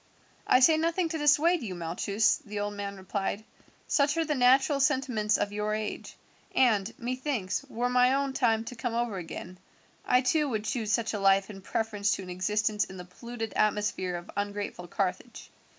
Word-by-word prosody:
"I 255 - +5
say 315 +4 +6
nothing 330 +2 0
to 320 - -3
dissuade 300 +4 +4
you, 200 -6 -5
Malchus," 195 +5 +1
the 210 0 -5
old 205 0 -2
man 200 -1 -5
replied, 195 +2 -3 0.4
"such 290 +2 +2
are 330 - +1
the 300 - 0
natural 265 +2 +4
sentiments 260 -7 +1
of 205 - -1
your 210 +1 -1
age; 215 -1 -5 0.4
and 215 -7 +3
methinks, 250 -4 -2
were 240 +1 -1
my 250 0 +4
own 275 -1 -1
time 225 -4 +2
to 250 - -7
come 235 0 -3
over 235 -4 -1
again, 180 +1 -8 0.4
I 250 - +3
too 295 +3 +1
would 215 -3 -2
choose 220 -2 -2
such 225 +1 0
a 210 - -2
life 195 +1 +3
in 195 -1 -10
preference 210 0 -1
to 195 - -4
an 180 - -8
existence 210 +3 0
in 190 - -11
the 180 - -8
polluted 225 +4 -7
atmosphere 210 -4 0
of 175 0 -8
ungrateful 205 -3 -4
Carthage. 195 +6 -3
220 Hz, 180 wpm, -28 LUFS, 200-255 Hz, 0.4 s, say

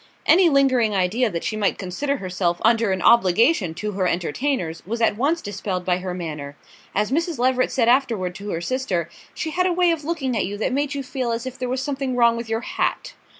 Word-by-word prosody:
Any 350 +1 +6
lingering 260 -7 +3
idea 210 +6 +1
that 170 -4 -4
she 215 - -2
might 210 -2 0
consider 275 +10 -2
herself 180 -4 -1
under 225 -2 +3
an 185 -1 -1
obligation 205 - +4
to 210 +4 -3
her 190 -2 0
entertainers 175 - -2
was 230 +5 -4
at 225 -3 +2
once 295 +9 0
dispelled 195 -3 -4
by 180 -1 +2
her 180 -1 -4
manner: 150 -5 -6 0.4
as 210 +3 0
Mrs. 330 +1 0
Leveret 255 +1 +1
said 235 -3 +1
afterward 235 -8 +2
to 200 +3 -8
her 165 -3 -3
sister, 180 -7 -2 0.2
she 320 - -3
had 365 +2 +1
a 360 - +1
way 355 0 +3
of 325 -2 -2
looking 285 -6 -2
at 215 - 0
you 205 +1 -5
that 225 +4 -1
made 285 +1 -1
you 280 - -3
feel 255 -1 -3
as 230 +1 -3
if 260 0 -7
there 250 -1 -2
was 260 +1 -1
something 270 -3 -2
wrong 235 -1 +4
with 235 -1 -6
your 225 0 -1
hat. - - -2
230 Hz, 225 wpm, -22 LUFS, 185-270 Hz, 0.4 s, Any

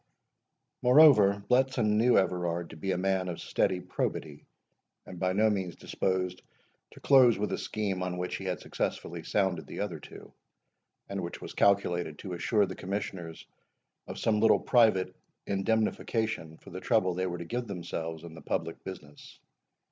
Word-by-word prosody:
Moreover, 125 -7 +6
Bletson 125 -4 +2
knew 120 +2 +4
Everard 85 -2 0
to - - -10
be 95 +5 -3
a 90 - 0
man 95 0 0
of 85 - -5
steady 95 -2 0
probity, 75 -4 -4 0.6
and 90 - -9
by 90 0 +1
no 105 +4 +3
means 95 -4 -3
disposed 90 -1 -2 0.5
to - - -15
close 130 -4 +6
with 105 - -2
a - - -1
scheme 100 -4 -2
on 90 -1 -3
which 90 0 -3
he 95 - -8
had 90 -1 -2
successfully - - -3
sounded 95 -4 -1
the - - -7
other - - -3
two, - - -13 0.7
and 100 -1 -4
which 85 0 -6
was - - -8
calculated 90 -6 +2
to 95 - -7
assure 100 +4 +2
the - - -6
Commissioners 95 -4 -5 0.6
of - - -7
some 110 -1 +1
little 110 +1 +5
private 105 -7 +3 0.3
indemnification 110 -3 -1
for - - -15
the 95 +1 -7
trouble 105 -6 +2
they 95 +1 -1
were 90 -1 -4
to 85 - -7
give 120 +6 -3
themselves 85 -4 -5
in 85 -1 -9
the 80 - -11
public 80 0 -3
business. 75 -6 -10
95 Hz, 165 wpm, -29 LUFS, 90-105 Hz, 0.7 s, Moreover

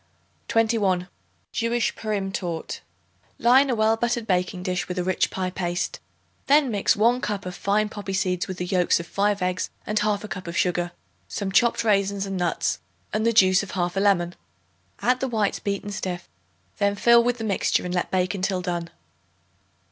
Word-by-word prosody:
21. 210 -6 +2 0.4
Jewish 235 0 0
Purim 205 -3 -2
Torte. 175 -4 -4 0.6
Line 260 +4 +5
a 250 - +1
well 220 0 +3
buttered 235 0 -1
baking 180 -2 0
dish 180 0 -2
with 180 - -5
a 180 - 0
rich 185 0 +1
pie 185 -1 -3
paste. 175 -1 -2 0.5
Then 285 -2 +4
mix 205 -2 +2
1 235 +4 +3
cup 205 -2 -3
of 180 - -5
fine 210 +3 +1
poppy 205 -2 -6
seeds 185 -2 0
with 185 - -5
the 180 - -3
yolks 180 -2 +2
of 170 - -6
5 200 +2 0
eggs 180 0 -1 0.2
and 210 0 0
1/2 210 0 0
cup 185 -3 -6
of 170 0 -4
sugar, 175 -1 +1 0.4
some 200 -2 -3
chopped 235 +3 +3
raisins 200 -2 +1
and 195 0 -4
nuts 175 -2 0 0.3
and 220 +1 +1
the - - +4
juice 190 -4 +5
of 200 - -8
1/2 180 +1 0
lemon. 180 -4 +2 0.7
Add 250 +1 +3
the 265 - -1
whites 215 -5 0
beaten 200 0 -3
stiff; 180 -3 -4 0.5
then 200 -1 +2
fill 235 +3 +5
with 245 0 0
the 225 - -5
mixture 200 -4 +1
and 180 - -3
let 175 - -1
bake 185 +1 0
until 190 -1 -1
done. 175 -2 -3
195 Hz, 180 wpm, -24 LUFS, 180-220 Hz, 0.7 s, Line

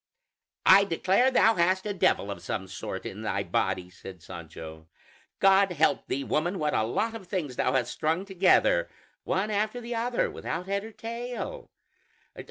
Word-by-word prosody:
"I 195 +1 +8
declare, 195 +6 +2
thou 225 -3 +4
hast 185 +1 +1
a 210 - -2
devil 105 - +1
of 95 - -7
some 95 +2 -4
sort 90 - -6
in - - -6
thy - - -1
body!" 90 -1 -1
said 90 -2 -11
Sancho. 80 -1 -10 0.5
"God 195 -1 +4
help 160 -1 +1
thee, 140 +1 -2
woman, 175 +8 -1
what 150 -2 -1
a - - +2
lot 215 - -1
of 215 -5 -9
things 160 -10 -3
thou 125 - +1
hast 130 -2 0
strung 165 +5 -1
together, 195 - +3 0.4
one 200 +3 0
after 215 +3 -1
the 240 0 -6
other, 235 +1 0
without 175 +2 -4
head 200 +1 -2
or 220 - -9
tail! 240 - -6
185 Hz, 170 wpm, -27 LUFS, -, 0.5 s, I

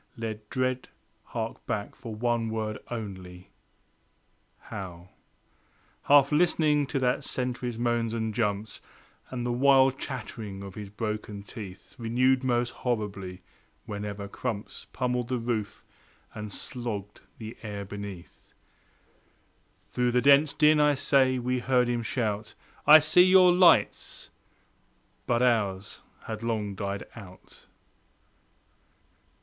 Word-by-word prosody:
Let 110 -2 -6
dread 130 -1 -1 0.4
hark - - -5
back 100 -1 -3
for 115 -3 -8
one 120 0 0
word 110 -1 -3
only: 95 -6 -7 1.1
how 90 -2 -9 1.0
Half 140 0 +6
listening 150 -2 +3
to 140 - -2
that 125 -1 +1
sentry's 125 -2 -3
moans 120 -1 0
and 110 -1 -2
jumps, 105 -1 -2 0.5
And 120 -2 -4
the 120 - 0
wild 135 +1 +4
chattering 100 -4 -6
of 100 -1 -8
his 105 -1 -8
broken 105 -1 -4
teeth, 100 -2 -10
Renewed 125 +3 +2
most 120 -1 +1
horribly 100 -6 -4 0.4
whenever 105 -1 -5
crumps 105 0 -5
Pummelled 125 -1 -1
the 130 0 -1
roof 115 -3 -3 0.5
and 105 -1 -7
slogged 105 -4 -5 0.2
the 110 0 -8
air 105 -2 -6
beneath 100 -3 -9 1.3
Through 125 -1 0
the 125 - +4
dense 140 +3 +6
din, 155 0 +4
I 150 -1 +4
say, 130 -1 +3
we 125 +1 -1
heard 125 -1 +2
him 120 -1 0
shout 110 -2 -2 0.3
"I 155 - +11
see 155 +3 +5
your 185 -1 +7
lights!" 180 -2 +3 1.0
But 120 0 +2
ours 105 -5 0 0.2
had 110 -1 -6
long 110 -3 -2
died 100 0 -4
out. 95 -5 -14
115 Hz, 120 wpm, -28 LUFS, 105-130 Hz, 1.3 s, I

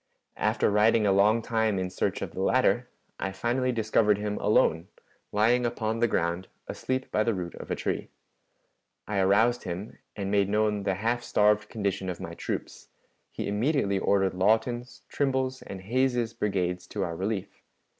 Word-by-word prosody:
After - - +1
riding 105 +1 +4
a 100 - +4
long 105 +4 +4
time 110 -3 +1
in 90 -1 -2
search - - -1
of - - -5
the 95 - -5
latter, 125 +2 +2 0.3
I 95 - -2
finally 125 +5 0
discovered 110 -2 +2
him 105 0 -3
alone, 85 -5 +2 0.4
lying 115 +4 +3
upon 115 -1 -1
the 120 - +3
ground 85 -2 -1 0.2
asleep 130 0 -3
by 110 - +2
the 115 -1 0
root 90 -2 -5
of - - -10
a - - 0
tree. - - -3 1.0
I 105 -2 -1
aroused 105 +6 +3
him, 90 +4 -6 0.2
and 100 -2 -3
made 100 -1 +2
known 105 0 +1
the 95 -2 +1
half 115 +5 0
starved 105 -2 +2
condition 100 -3 -2
of 90 - -5
my 85 -3 -6
troops; - - -5 0.4
he - - -4
immediately 105 -1 +1
ordered 95 -1 +2
Lawton's, 115 +6 0
Trimble's, 130 -2 -1
and 95 -1 -8
Hays's 120 +2 0
brigades 90 -4 -1
to 100 - -3
our 85 -2 -3
relief. 100 +2 -4
105 Hz, 165 wpm, -27 LUFS, 95-115 Hz, 1.0 s, riding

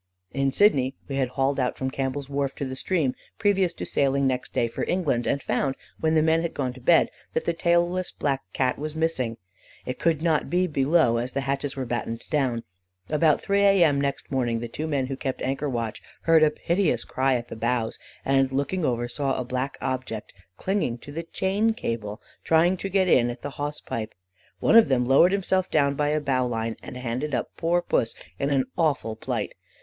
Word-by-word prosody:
"In 135 0 +1
Sydney 135 -9 +3
we 135 - -3
had 130 -2 +1
hauled 135 +2 0
out 125 -1 0
from 130 0 -2
Campbell's 135 +1 -3
Wharf 140 -1 -2
to 140 - -3
the 130 0 -5
stream, 145 -2 0 0.2
previous 195 -4 +2
to - - -6
sailing 140 0 +1
next 130 -1 -1
day 120 - +1
for 115 - -4
England, 150 -10 0
and 140 - 0
found, 135 -1 0 0.2
when 160 0 +2
the 155 - +4
men 160 +1 +3
had 170 - -3
gone 130 -3 -1
to 130 - -13
bed, 165 +6 +4 0.2
that - - -1
the 170 - +1
tailless 175 +2 +1
black 135 -2 -1
Cat 130 +4 0
was 155 +1 -4
missing. 130 -8 -1 0.5
It 125 - -4
could 165 -2 +1
not 160 -3 +1
be 180 +1 +2
below, 145 -5 +3
as 125 +2 -3
the 140 - 0
hatches 135 0 -2
were 135 -1 -3
battened 115 -1 -3
down. 130 -6 +1 0.5
About 155 0 +3
3 200 0 +2
A.M. 175 -8 +5
next 140 -1 -3
morning, 120 -4 0
the 120 +1 -4
two 155 +7 -4
men 140 -4 0
who 135 +1 -4
kept 135 -1 -3
anchor 135 +2 -1
watch 115 -4 -3 0.2
heard 165 -1 +5
a 155 - +6
piteous 170 +4 0
cry 130 0 +1
at 120 -1 -4
the - - -6
bows, 115 0 -1 0.3
and 135 -1 +3
looking 140 +7 -1
over 120 -3 0
saw 135 +2 -1
a 125 - -3
black 130 +2 -3
object 130 -4 -4 0.2
clinging 190 - -1
to 145 - -11
the 160 +3 -3
chain 195 +6 0
cable, 110 - -4 0.2
trying 165 +3 +4
to 195 - -4
get 190 -1 +2
in 120 -8 +4
at 120 - -7
the 145 - -4
hawse 145 +1 -4
pipe. 110 -2 -5 0.4
One - - +3
of 230 - +8
them 125 -2 +2
lowered 135 +8 +6
himself 190 -1 +1
down 140 -2 +3
by 145 +1 0
a 155 +1 +1
bowline, 125 -5 -1
and 125 - -8
handed 125 +3 -2
up - - -3
poor 175 +1 +1
Pussy 115 - 0 0.2
in 140 - 0
an 135 -2 +2
awful 145 -9 0
plight. - - -3
140 Hz, 205 wpm, -25 LUFS, 125-165 Hz, 0.5 s, of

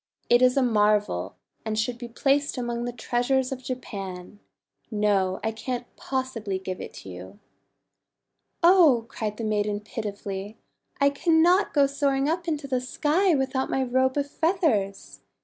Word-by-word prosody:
It 240 +1 +6
is 255 +1 +4
a 270 - +4
marvel, 210 - +1 0.3
and 220 -1 -3
should 235 +2 -1
be 240 - -6
placed 275 +4 +1
among 240 -1 -2
the 245 - -2
treasures 245 +2 0
of 260 -1 -4
Japan. 200 -7 -6 0.5
No, 205 -4 +1
I 220 - 0
can't 245 +2 -4
possibly 245 -7 -3
give 185 -1 -6
it - - -7
to 95 - -10
you." 95 +2 -10 1.2
"Oh!* 330 -10 +6
cried 210 -1 -4
the 230 - -5
maiden 210 -1 0
pitifully, 205 -2 -6 0.4
"I 280 0 +4
cannot 335 +6 +3
go 285 -2 +4
soaring 275 0 0
up 340 +2 -1
into 305 -3 -2
the 255 -2 0
sky 315 +8 +1
without 265 -1 -1
my 265 - +1
Robe 260 +2 +1
of 285 0 0
Feathers. 310 - 0
245 Hz, 150 wpm, -26 LUFS, 210-275 Hz, 1.2 s, It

